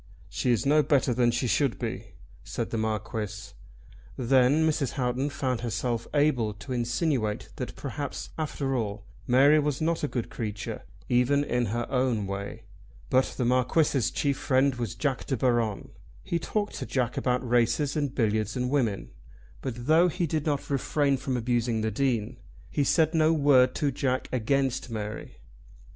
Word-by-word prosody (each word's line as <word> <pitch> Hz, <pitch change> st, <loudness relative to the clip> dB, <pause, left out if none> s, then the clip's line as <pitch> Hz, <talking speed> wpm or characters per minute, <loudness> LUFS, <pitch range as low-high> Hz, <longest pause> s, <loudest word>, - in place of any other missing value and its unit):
"She -, -, -2 dB
is 120 Hz, 0 st, +1 dB
no 150 Hz, +2 st, +5 dB
better 140 Hz, -3 st, +2 dB
than 120 Hz, 0 st, +3 dB
she 120 Hz, +2 st, 0 dB
should 135 Hz, +1 st, +1 dB
be," 110 Hz, -3 st, -5 dB, 0.3 s
said -, -, -4 dB
the -, -, -1 dB
Marquis. 110 Hz, -1 st, -3 dB, 0.7 s
Then 130 Hz, +5 st, +4 dB
Mrs. 145 Hz, -5 st, 0 dB
Houghton 130 Hz, +2 st, -1 dB
found 130 Hz, -5 st, -2 dB
herself 120 Hz, 0 st, -2 dB
able 125 Hz, -8 st, +2 dB
to 130 Hz, +5 st, -7 dB
insinuate 120 Hz, -2 st, -1 dB
that -, -, -5 dB
perhaps, -, -, -5 dB
after 140 Hz, -3 st, -2 dB
all, 105 Hz, -3 st, -3 dB, 0.2 s
Mary 140 Hz, +5 st, +6 dB
was 145 Hz, -2 st, -1 dB
not 165 Hz, 0 st, 0 dB
a -, -, +2 dB
good 120 Hz, -5 st, -4 dB
creature, 105 Hz, -2 st, -5 dB, 0.3 s
even 125 Hz, +4 st, +3 dB
in 125 Hz, -4 st, 0 dB
her 120 Hz, +3 st, -2 dB
own 125 Hz, -5 st, +1 dB
way. 100 Hz, +1 st, -5 dB, 0.5 s
But 130 Hz, +1 st, +2 dB
the 125 Hz, -, 0 dB
Marquis's 130 Hz, +2 st, +2 dB
chief 140 Hz, -2 st, -1 dB
friend 135 Hz, +1 st, +2 dB
was 120 Hz, -5 st, -4 dB
Jack 140 Hz, -4 st, -2 dB
De 135 Hz, -, 0 dB
Baron. 120 Hz, -4 st, 0 dB, 0.3 s
He 170 Hz, -, -1 dB
talked 205 Hz, +4 st, -2 dB
to -, -, -5 dB
Jack 125 Hz, -2 st, -1 dB
about 125 Hz, 0 st, 0 dB
races 120 Hz, +4 st, +2 dB
and 145 Hz, -3 st, -1 dB
billiards, 110 Hz, -1 st, 0 dB
and 125 Hz, 0 st, -1 dB
women; 115 Hz, -9 st, 0 dB, 0.5 s
but 120 Hz, -2 st, -5 dB
though 160 Hz, +4 st, +5 dB
he 180 Hz, 0 st, -1 dB
did 155 Hz, -1 st, -2 dB
not 145 Hz, -1 st, -1 dB
refrain 140 Hz, +1 st, +1 dB
from 130 Hz, 0 st, -2 dB
abusing 120 Hz, -1 st, 0 dB
the 110 Hz, 0 st, -1 dB
Dean, 120 Hz, -1 st, -1 dB, 0.3 s
he 145 Hz, -, +1 dB
said 160 Hz, +3 st, +3 dB
no 160 Hz, 0 st, +4 dB
word 140 Hz, -4 st, +4 dB
to 145 Hz, -2 st, 0 dB
Jack 130 Hz, 0 st, -1 dB
against 130 Hz, +1 st, 0 dB
Mary. 105 Hz, -2 st, -6 dB
125 Hz, 165 wpm, -27 LUFS, 115-140 Hz, 0.7 s, Mary